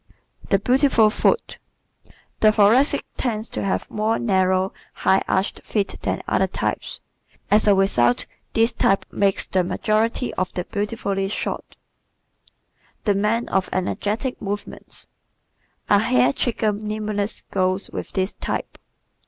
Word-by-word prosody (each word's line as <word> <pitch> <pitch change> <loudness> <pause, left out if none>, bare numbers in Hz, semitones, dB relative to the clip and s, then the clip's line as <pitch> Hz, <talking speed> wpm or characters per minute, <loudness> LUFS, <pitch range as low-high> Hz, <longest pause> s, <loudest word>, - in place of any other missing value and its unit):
The 195 - +4
Beautiful 250 0 +3
Foot 465 - 0 0.5
¶ - - -21 0.3
The 215 - +6
Thoracic 230 +8 +4
tends 225 -3 -2
to - - -4
have 195 - -1
more 215 +2 0
narrow, 190 -3 +1 0.2
high 190 - +2
arched 190 +1 -1
feet 205 -2 -2
than - - -2
other - - +2
types. - - -3 0.5
As 210 +1 +5
a 205 - +6
result 125 -11 +3 0.3
this 225 +1 +3
type 195 - +2
makes 200 -1 +1
the 185 -1 +1
majority 215 +6 0
of 185 0 -2
the 180 - -1
beautifully 200 -1 -2
shod. 200 - -2 1.4
The 205 - +3
Man 210 +4 0
of 190 -1 0
Energetic 210 +7 -2
Movements 205 0 -5 0.8
¶ - - +6
A - - +5
hair 130 - +3
trigger 220 - 0
nimbleness 210 0 -3
goes 185 +1 0
with - - -6
this 190 0 0
type. - - -5
205 Hz, 135 wpm, -22 LUFS, 190-220 Hz, 1.4 s, The